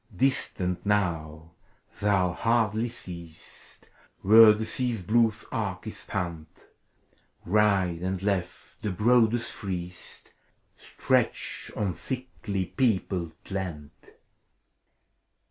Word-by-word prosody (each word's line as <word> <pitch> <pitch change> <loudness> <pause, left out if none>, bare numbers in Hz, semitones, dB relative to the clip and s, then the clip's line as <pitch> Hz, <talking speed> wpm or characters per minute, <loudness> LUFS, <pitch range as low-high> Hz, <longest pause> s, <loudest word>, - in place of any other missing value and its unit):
Distant 90 -7 0
now, 80 -6 -1 0.5
thou 95 -4 +2
hardly 115 +1 +1
seest 85 -8 -12 0.4
Where 110 +2 +9
the 105 +1 -1
Sea's 120 -5 -2
blue 115 +4 +4 0.2
arc 100 -6 -3
is 110 - -6
spanned, 85 -5 -4 0.6
— - - -39
Right 95 -3 +2
and 95 +1 -2
left, 100 -3 -3
the 105 - -2
broadest, 115 +2 +2
freest 90 -3 -7 0.4
Stretch - - -1
of 100 -5 -1
thickly 125 -7 -4
peopled 95 - -1 0.2
land. 85 -7 -4
100 Hz, 95 wpm, -27 LUFS, 90-110 Hz, 0.6 s, Where